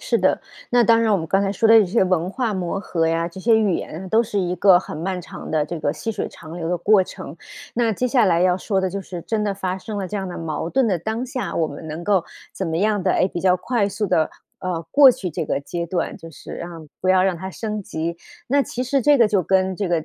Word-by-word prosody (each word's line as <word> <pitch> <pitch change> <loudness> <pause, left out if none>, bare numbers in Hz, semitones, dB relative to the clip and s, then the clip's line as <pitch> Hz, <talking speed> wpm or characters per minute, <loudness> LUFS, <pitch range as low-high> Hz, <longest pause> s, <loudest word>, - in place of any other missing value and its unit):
是 - - 0
的， - - +2 0.3
那 245 -1 +4
当 230 +1 +5
然 225 -1 +2
我 205 - +4
们 160 - -4
刚 195 +4 +2
才 195 -1 0
说 220 +3 +1
的 225 0 +8
这 200 - +2
些 190 +1 +2
文 180 -2 +1
化 240 -1 -1
磨 185 -1 -2
合 165 -4 -1
呀、 165 +1 0
这 175 +2 -9
些 225 +3 +4
语 210 -4 +2
言 180 +5 -5
都 225 +2 +4
是 215 -2 -3
一 180 -2 0
个 185 0 +6
很 185 - -7
漫 185 +2 -2
长 - - -9
的 155 -1 +1
这 165 0 -6
个 145 - +1
细 225 +8 -4
水 - - -3
长 160 +1 -11
流 165 -1 -3
的 180 - +1
过 195 +3 +4
程， 185 -5 -9 0.4
那 235 -1 +1
接 235 +4 -1
下 245 -3 +3
来 170 -1 +3
要 180 -1 +4
说 195 +1 -1
的 190 - 0
就 200 +2 -4
是 175 -2 -8
真 220 -2 -1
的 200 -2 -1
发 190 -1 -3
生 210 +2 -6
了 195 -2 -2
这 195 - -8
样 195 -2 -3
的 175 - -6
矛 160 0 -3
盾 260 +4 +2
的 185 -5 +1
当 220 +7 -3
下， 255 0 -4
我 160 - +2
们 155 +2 -8
能 160 +3 -6
够 195 -4 +3 0.3
怎 190 -3 -3
么 160 - -1
样 205 +2 +1
的 - - +2
诶， - - +3
比 175 - -5
较 185 0 +3
快 230 +1 0
速 210 +1 -2
地， 160 -3 +2 0.3
呃， 180 -3 -3
过 280 -2 +8
去 185 -7 -4
这 155 - -3
个 - - 0
阶 170 +4 -4
段， 170 0 -2
就 165 - -11
是 - - -11
让 170 -2 -8
不 185 - -1
要 185 0 +5
让 190 -1 +2
它 190 +3 -6
升 215 +1 -4
级。 170 -3 -4 0.3
那 280 +2 +3
其 250 0 -4
实 275 +2 +1
这 290 +3 +5
个 235 - +5
就 200 -3 +1
跟 190 +1 +1
这 200 0 -2
个 165 -3 0
190 Hz, 300 characters per minute, -22 LUFS, 170-215 Hz, 0.4 s, 的